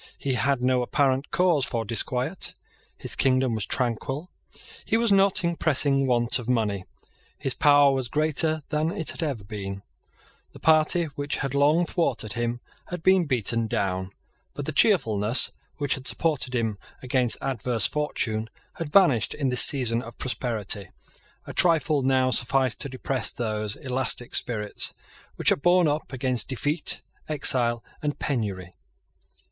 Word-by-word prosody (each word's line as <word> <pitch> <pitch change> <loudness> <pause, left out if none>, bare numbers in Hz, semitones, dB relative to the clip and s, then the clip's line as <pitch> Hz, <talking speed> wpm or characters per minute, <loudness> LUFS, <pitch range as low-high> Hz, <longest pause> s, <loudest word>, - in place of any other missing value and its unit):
He 135 - -2
had 125 +2 0
no 130 0 +2
apparent 135 +2 0
cause 175 -6 +2
for 115 -3 0
disquiet. 125 - -3 0.4
His - - -6
kingdom 130 -2 +2
was 110 -2 -3
tranquil: 135 +6 -2 0.5
he 225 - +1
was 230 -2 +1
not 195 -1 +4
in 170 0 0
pressing 140 -3 +2
want 120 0 +2
of 120 0 -7
money: 105 -6 0 0.5
his 135 - -2
power 145 +1 +5
was 130 -2 -2
greater 155 +1 0
than 155 +1 0
it 165 - 0
had - - -7
ever 140 -10 -3
been: 100 -1 -7 0.7
the - - -13
party 160 +2 +3
which 145 +1 -3
had 135 -2 -3
long 150 +5 +3
thwarted 160 - -1
him 120 0 -3 0.3
had 175 -2 -7
been 190 -2 +4
beaten 115 -4 0
down; 95 -3 -2 0.5
but - - -5
the - - -2
cheerfulness 110 +3 +2 0.3
which 145 -2 0
had 130 0 -5
supported 150 -6 +1
him 110 -4 -1 0.2
against 125 -2 0
adverse 120 -4 -1
fortune 115 -7 -1 0.3
had 160 -3 -5
vanished 150 - +3
in 140 -3 -1
this 125 -2 +5
season 120 -5 +3
of 115 -1 -11
prosperity. 110 -6 -2 0.6
A - - -8
trifle 160 -4 +3
now 130 -1 +2
sufficed 130 +2 0
to 140 - +1
depress 130 -3 -2
those 110 -3 -3
elastic 130 -2 -2
spirits 105 -4 0 0.4
which - - +3
had - - +1
borne 175 0 +4
up 150 -3 -2
against 130 -2 -2
defeat, 145 +5 0 0.3
exile, 120 -5 +3 0.2
and 145 -1 -2
penury. 100 - -3
130 Hz, 150 wpm, -25 LUFS, 115-150 Hz, 0.7 s, power